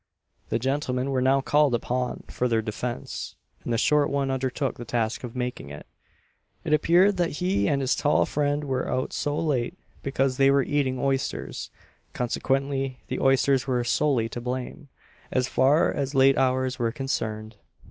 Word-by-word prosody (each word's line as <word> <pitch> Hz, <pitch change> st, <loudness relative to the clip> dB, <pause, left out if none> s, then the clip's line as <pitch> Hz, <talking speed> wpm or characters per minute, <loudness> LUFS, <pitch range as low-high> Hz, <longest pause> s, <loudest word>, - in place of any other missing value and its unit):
The -, -, +1 dB
gentlemen 130 Hz, +1 st, -1 dB
were 130 Hz, -1 st, +1 dB
now 135 Hz, +1 st, +3 dB
called 145 Hz, -2 st, +3 dB
upon 125 Hz, +1 st, -2 dB
for 125 Hz, -, -1 dB
their 115 Hz, -2 st, +1 dB
defence, 120 Hz, +3 st, -5 dB, 0.3 s
and -, -, -4 dB
the 115 Hz, -, +2 dB
short 145 Hz, +4 st, +3 dB
one 140 Hz, -1 st, 0 dB
undertook 130 Hz, +1 st, -2 dB
the -, -, -5 dB
task 115 Hz, -1 st, -2 dB
of 120 Hz, -1 st, -7 dB
making 125 Hz, -, -4 dB
it. 75 Hz, +1 st, -9 dB, 0.8 s
It -, -, 0 dB
appeared 180 Hz, +6 st, +4 dB
that 175 Hz, -2 st, 0 dB
he 185 Hz, +2 st, +1 dB
and 140 Hz, -2 st, +1 dB
his 130 Hz, -, +2 dB
tall 145 Hz, 0 st, +2 dB
friend 145 Hz, 0 st, 0 dB
were 135 Hz, -3 st, -2 dB
out 130 Hz, +2 st, -2 dB
so 145 Hz, 0 st, -1 dB
late 150 Hz, +1 st, -1 dB, 0.2 s
because 135 Hz, -1 st, 0 dB
they 135 Hz, 0 st, +5 dB
were 140 Hz, 0 st, +4 dB
eating 135 Hz, -2 st, 0 dB
oysters, 135 Hz, +1 st, -2 dB, 0.4 s
consequently 135 Hz, +2 st, -1 dB
the -, -, -2 dB
oysters 135 Hz, 0 st, +3 dB
were 125 Hz, -2 st, +1 dB
solely 125 Hz, -2 st, +1 dB
to 120 Hz, -, -6 dB
blame, 130 Hz, +4 st, -5 dB, 0.4 s
as 130 Hz, -1 st, +1 dB
far 140 Hz, +6 st, +3 dB
as 140 Hz, -1 st, -3 dB
late 135 Hz, 0 st, +6 dB
hours 130 Hz, 0 st, +1 dB
were 115 Hz, -1 st, +1 dB
concerned. 110 Hz, -4 st, -4 dB
135 Hz, 170 wpm, -26 LUFS, 125-140 Hz, 0.8 s, late